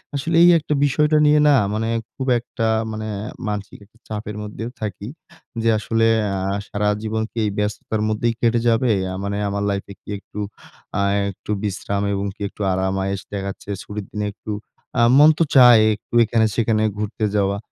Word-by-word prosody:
আসলে 160 Hz, +4 st, -1 dB
এই 175 Hz, -, +8 dB
একটা 150 Hz, 0 st, -2 dB
বিষয়টা 150 Hz, +2 st, +2 dB
নিয়ে 150 Hz, 0 st, +5 dB
না 145 Hz, -, +6 dB, 0.2 s
মানে 115 Hz, +1 st, -1 dB, 0.3 s
খুব 135 Hz, -1 st, -4 dB
একটা 115 Hz, -1 st, -3 dB, 0.2 s
মানে 110 Hz, 0 st, -5 dB, 0.4 s
মানসিক 105 Hz, -1 st, -5 dB
একটা 115 Hz, +3 st, -28 dB
চাপের 105 Hz, -1 st, -5 dB
মধ্যেও 110 Hz, +3 st, -6 dB
থাকি। 100 Hz, 0 st, -5 dB, 0.6 s
যে 115 Hz, -, +3 dB
আসলে 115 Hz, +1 st, +1 dB, 0.3 s
আ -, -, -2 dB, 0.3 s
সারা 105 Hz, 0 st, 0 dB
জীবন 110 Hz, 0 st, -1 dB
কি -, -, -16 dB
এই 105 Hz, -, 0 dB
ব্যস্ততার 105 Hz, +1 st, -2 dB
মধ্যেই 115 Hz, +2 st, 0 dB
কেটে 115 Hz, 0 st, +2 dB
যাবে? 115 Hz, +1 st, +3 dB, 0.2 s
আ -, -, -4 dB
মানে 100 Hz, 0 st, -2 dB
আমার 100 Hz, 0 st, -2 dB
লাইফে 100 Hz, 0 st, -3 dB
কি -, -, -15 dB
একটু 105 Hz, -, -10 dB, 0.6 s
আ -, -, +2 dB, 0.3 s
একটু 100 Hz, -, -8 dB
বিশ্রাম 100 Hz, 0 st, -2 dB
এবং 100 Hz, +1 st, -2 dB
কি -, -, -18 dB
একটু -, -, -12 dB
আরাম 95 Hz, +1 st, 0 dB
আয়েশ 95 Hz, 0 st, -2 dB
দেখা 100 Hz, -1 st, -3 dB
যাচ্ছে 100 Hz, -, -14 dB
ছুটির 105 Hz, -1 st, -6 dB
দিনে 105 Hz, 0 st, -3 dB
একটু 110 Hz, -, -8 dB, 0.5 s
আ -, -, +5 dB, 0.2 s
মন 150 Hz, +2 st, +8 dB
তো 165 Hz, -, +4 dB
চায় 125 Hz, -4 st, +8 dB
একটু 105 Hz, -, -22 dB
এখানে 110 Hz, 0 st, +2 dB
সেখানে 110 Hz, -2 st, +1 dB
ঘুরতে 105 Hz, +1 st, -2 dB
যাওয়া। 100 Hz, 0 st, +1 dB
110 Hz, 185 wpm, -21 LUFS, 100-115 Hz, 0.6 s, এই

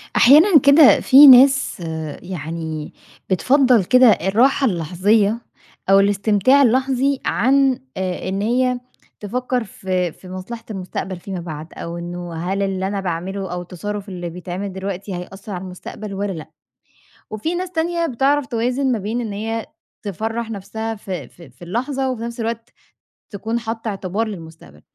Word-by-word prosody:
أحيانًا 305 Hz, -, +7 dB
كده 280 Hz, +2 st, +7 dB
في 280 Hz, +2 st, +8 dB
ناس 270 Hz, -1 st, +6 dB, 0.4 s
يعني، 160 Hz, -3 st, -6 dB, 0.4 s
بتفضّل 250 Hz, +3 st, +3 dB
كده 255 Hz, +6 st, +5 dB
الراحة 225 Hz, -, +3 dB
اللحظية 200 Hz, -, +1 dB, 0.5 s
أو 195 Hz, -, +7 dB
الاستمتاع 205 Hz, +6 st, +3 dB
اللحظي 265 Hz, +2 st, +2 dB
عن، 265 Hz, +3 st, +2 dB, 0.2 s
آآ، 185 Hz, -1 st, -3 dB
إن 195 Hz, +1 st, -2 dB
هي 250 Hz, +3 st, +1 dB, 0.4 s
تفكر 250 Hz, +3 st, -2 dB
في 185 Hz, -3 st, -3 dB
في 185 Hz, -, -15 dB
مصلحة 190 Hz, +5 st, -7 dB
المستقبل 185 Hz, -1 st, -5 dB
فيما 190 Hz, 0 st, -6 dB
بعد، 160 Hz, -2 st, -8 dB
أو 170 Hz, +1 st, -6 dB
إنه 175 Hz, 0 st, -6 dB
هل 180 Hz, +4 st, -2 dB
اللي 190 Hz, -1 st, -2 dB
أنا 200 Hz, 0 st, -2 dB
باعمله 190 Hz, +1 st, -4 dB
أو 180 Hz, -, -4 dB
التصرف 200 Hz, +4 st, -6 dB
اللي 175 Hz, -2 st, -5 dB
بيتعمل 180 Hz, +3 st, -6 dB
دلوقتي 190 Hz, 0 st, -5 dB
هيأثّر 195 Hz, +4 st, -9 dB
على 180 Hz, -, -5 dB
المستقبل 190 Hz, +3 st, -8 dB
والَّا 200 Hz, +1 st, -3 dB
لأ. 160 Hz, -3 st, -9 dB, 0.8 s
وفي 215 Hz, +11 st, -3 dB
ناس 365 Hz, 0 st, -4 dB
تانية 335 Hz, 0 st, -1 dB
بتعرف 275 Hz, +1 st, +1 dB
توازن 250 Hz, +2 st, 0 dB
ما 235 Hz, -, 0 dB
بين 220 Hz, +5 st, -3 dB
إن 220 Hz, -4 st, -5 dB
هي 225 Hz, +2 st, -3 dB, 0.4 s
تفرّح 225 Hz, +4 st, -3 dB
نفسها 220 Hz, +2 st, -5 dB
في 185 Hz, -, -6 dB
في 170 Hz, +1 st, -16 dB
في 125 Hz, -, -28 dB
اللحظة، 260 Hz, +7 st, -2 dB
وفي 245 Hz, -3 st, -6 dB
نفس 235 Hz, 0 st, -6 dB
الوقت 230 Hz, 0 st, -4 dB, 0.6 s
تكون 225 Hz, +3 st, -3 dB
حاطة 225 Hz, 0 st, -5 dB
اعتبار 200 Hz, +2 st, -3 dB
للمستقبل. 160 Hz, -, -11 dB
205 Hz, 145 wpm, -20 LUFS, 185-250 Hz, 0.8 s, في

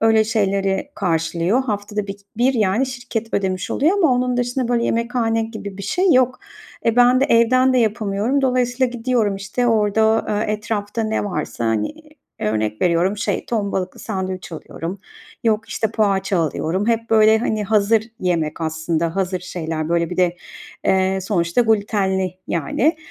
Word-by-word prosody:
öyle 225 Hz, -1 st, +4 dB
şeyleri 195 Hz, +2 st, 0 dB
karşılıyor. 170 Hz, -, 0 dB
Haftada 210 Hz, -3 st, -3 dB
bir 195 Hz, -, -4 dB
k -, -, -30 dB, 0.2 s
bir, 255 Hz, +3 st, +2 dB
yani, 220 Hz, +3 st, +2 dB
şirket 240 Hz, -3 st, -5 dB
ödemiş 190 Hz, -2 st, -1 dB
oluyor 310 Hz, +7 st, +2 dB
ama 320 Hz, -8 st, +4 dB
onun 250 Hz, 0 st, +1 dB
dışında, 245 Hz, 0 st, -1 dB
böyle, 235 Hz, -1 st, +1 dB
yemekhane 230 Hz, -1 st, 0 dB
gibi 220 Hz, -3 st, -7 dB
bir -, -, -6 dB
şey 360 Hz, -, +2 dB
yok. 255 Hz, -1 st, +3 dB, 0.5 s
E, 230 Hz, 0 st, +2 dB
ben 245 Hz, +1 st, +5 dB
de -, -, +4 dB
evden 255 Hz, +1 st, +4 dB
de 255 Hz, -, +3 dB
yapamıyorum. 220 Hz, +3 st, 0 dB
Dolayısıyla 255 Hz, 0 st, +1 dB
gidiyorum, 240 Hz, -4 st, 0 dB
işte, 200 Hz, +5 st, -2 dB
orada, 220 Hz, 0 st, +2 dB
eee, 210 Hz, +1 st, 0 dB
etrafta 210 Hz, 0 st, -3 dB
ne 220 Hz, -1 st, -1 dB
varsa, 155 Hz, -, -3 dB
hani, 110 Hz, -2 st, 0 dB, 0.5 s
örnek 110 Hz, 0 st, -1 dB
veriyorum, 180 Hz, +3 st, +2 dB
şey, 210 Hz, -, -2 dB
ton 210 Hz, -4 st, -1 dB
balıklı 185 Hz, -1 st, -3 dB
sandviç 190 Hz, -4 st, -4 dB
alıyorum, 165 Hz, +3 st, -6 dB, 0.4 s
yok, 225 Hz, 0 st, +1 dB
işte, 220 Hz, -1 st, -1 dB
poğaça 195 Hz, -3 st, +1 dB
alıyorum. 165 Hz, +5 st, -1 dB
Hep, 230 Hz, 0 st, 0 dB
böyle, 220 Hz, 0 st, +5 dB
hani, 215 Hz, -2 st, -1 dB
hazır 215 Hz, +1 st, +3 dB, 0.2 s
yemek 170 Hz, -4 st, -1 dB
aslında, 160 Hz, +1 st, -1 dB
hazır 185 Hz, -1 st, -1 dB
şeyler. 160 Hz, -3 st, -4 dB
Böyle, 170 Hz, -1 st, +1 dB
bir 180 Hz, -, -4 dB
de, 175 Hz, -1 st, +2 dB, 0.5 s
eee, 190 Hz, 0 st, +2 dB
sonuçta 175 Hz, 0 st, +1 dB
glütenli, 200 Hz, -4 st, +1 dB
yani. 240 Hz, -, +1 dB
210 Hz, 160 wpm, -20 LUFS, 185-235 Hz, 0.5 s, ben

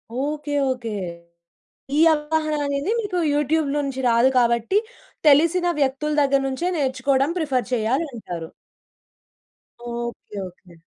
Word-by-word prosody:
Okay. 295 Hz, +3 st, -3 dB, 0.2 s
Okay. 245 Hz, -3 st, -4 dB, 1.1 s
ఈ -, -, +4 dB
అవగాహన 310 Hz, 0 st, -1 dB
అనేది 280 Hz, +6 st, -1 dB
మీకు 400 Hz, -4 st, -3 dB, 0.2 s
యూట్యూబ్‌లో 295 Hz, 0 st, +1 dB
నుంచి 265 Hz, -1 st, -4 dB
రాదు 235 Hz, +2 st, +4 dB
కాబట్టి, 235 Hz, -, +2 dB, 0.5 s
తెలిసిన 335 Hz, +5 st, +5 dB
వ్యక్తుల 280 Hz, +2 st, 0 dB
దగ్గర 275 Hz, -1 st, +3 dB
నుంచే 270 Hz, +7 st, -2 dB
నేర్చుకోవడం 270 Hz, 0 st, +1 dB
ప్రిఫర్ 270 Hz, -8 st, 0 dB
చేయాలి 245 Hz, +7 st, +1 dB
అంటారు. 175 Hz, -8 st, -6 dB, 1.5 s
ఓకె. 235 Hz, -3 st, -6 dB
ఓకె. 180 Hz, 0 st, -17 dB
275 Hz, 110 wpm, -22 LUFS, 245-300 Hz, 1.5 s, తెలిసిన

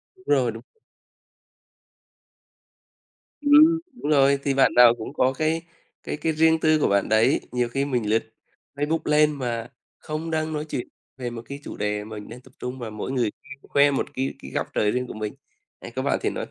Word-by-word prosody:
Đúng 185 Hz, -, -23 dB
rồi, 130 Hz, -5 st, +3 dB
đúng. 115 Hz, +1 st, -10 dB, 2.8 s
Ừm, 305 Hz, +3 st, +6 dB, 0.2 s
đúng 150 Hz, -, -1 dB
rồi, 140 Hz, -1 st, +4 dB
thì 140 Hz, -, +1 dB
bạn 135 Hz, 0 st, +4 dB
nào 120 Hz, -1 st, +8 dB
cũng 115 Hz, +4 st, -7 dB
có 130 Hz, -2 st, +2 dB
cái 155 Hz, +4 st, 0 dB, 0.4 s
cái -, -, -4 dB
cái 160 Hz, +2 st, -1 dB
riêng 160 Hz, +1 st, +4 dB
tư 155 Hz, -1 st, +3 dB
của -, -, +2 dB
bạn 100 Hz, +1 st, +1 dB
đấy. 110 Hz, 0 st, +4 dB
Nhiều 125 Hz, -1 st, 0 dB
khi 135 Hz, +3 st, -1 dB
mình 120 Hz, -6 st, -1 dB
lướt 110 Hz, +1 st, +2 dB, 0.5 s
Facebook 150 Hz, +3 st, 0 dB
lên 150 Hz, 0 st, +4 dB
mà 120 Hz, -5 st, -4 dB, 0.3 s
không 155 Hz, +2 st, -5 dB
đang 155 Hz, 0 st, -1 dB
nói 150 Hz, 0 st, -3 dB
chuyện 125 Hz, -, -3 dB, 0.3 s
về 125 Hz, -2 st, -4 dB
một 120 Hz, -1 st, -7 dB
cái 140 Hz, +1 st, -6 dB
chủ -, -, -8 dB
đề 105 Hz, 0 st, -1 dB
mình 105 Hz, 0 st, -9 dB
đang 125 Hz, +2 st, -10 dB
tập 130 Hz, 0 st, -20 dB
trung 125 Hz, +1 st, -5 dB
và 120 Hz, -, -5 dB
mỗi 110 Hz, +4 st, -5 dB
người 125 Hz, -5 st, +1 dB, 0.3 s
khoe 145 Hz, +1 st, +3 dB
một 135 Hz, -, 0 dB
cái 135 Hz, 0 st, -2 dB
cái -, -, -10 dB
góc -, -, -2 dB
trời 105 Hz, 0 st, +2 dB
riêng 125 Hz, 0 st, -2 dB
của -, -, -7 dB
mình. 110 Hz, -1 st, -4 dB, 0.5 s
Đấy -, -, -8 dB
có -, -, -1 dB
bạn -, -, 0 dB
thì -, -, +1 dB
nói -, -, -4 dB
135 Hz, 205 wpm, -24 LUFS, 120-150 Hz, 2.8 s, nào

